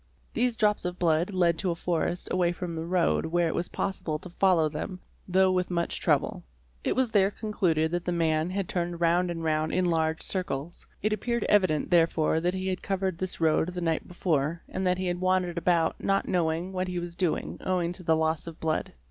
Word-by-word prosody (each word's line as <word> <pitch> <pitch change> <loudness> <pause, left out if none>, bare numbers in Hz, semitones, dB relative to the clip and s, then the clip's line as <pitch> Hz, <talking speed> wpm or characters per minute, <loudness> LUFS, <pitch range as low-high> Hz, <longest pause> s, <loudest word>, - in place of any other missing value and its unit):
These 245 -1 +1
drops 210 -1 +2
of 180 0 -3
blood 170 +2 +2
led 175 -3 +2
to 190 - 0
a 170 - 0
forest 175 +1 -1
away 175 -1 +2
from 175 -2 -5
the 160 +1 -4
road, 175 -2 +1
where 170 +1 +1
it 160 - -1
was 175 - -2
possible 165 -5 -2
to 175 +3 -11
follow 175 -4 +3
them, 155 +5 -5 0.3
though 190 +1 +4
with 180 -1 0
much 170 -1 -1
trouble. - - +1 0.4
It - - 0
was 255 -3 +1
there 195 -3 +4
con 215 +1 -6
cluded 160 -6 +1
that 175 0 -2
the 180 - 0
man 160 -1 +1
had 190 -1 -2
turned 175 -1 -2
round 175 +1 +2
and 165 -1 -4
round 155 0 0
in 185 - +2
large 160 -2 0
circles. 175 -4 -3 0.2
It 215 +1 +2
appeared 235 +2 -1
evident 185 -8 +2
therefore 165 -2 +3
that 175 +3 0
he 190 0 -3
had 185 -1 -2
covered 190 -3 -2
this 185 -1 -3
road 160 +1 +2
the 180 0 -5
night 165 -2 -1
before 165 -2 -1
and 190 0 -2
that 180 0 +2
he 185 - -2
had 175 0 -2
wandered 185 -2 +1
about 170 -2 +1
not 195 0 +1
knowing 175 +1 0
what 185 0 -1
he 180 -1 -3
was 175 0 -4
doing 180 -3 -1
owing 180 -2 0
to 180 - -6
the 165 -2 +2
loss 160 0 0
of 165 -1 -8
blood®®. 160 -1 -1
175 Hz, 220 wpm, -28 LUFS, 165-185 Hz, 0.4 s, though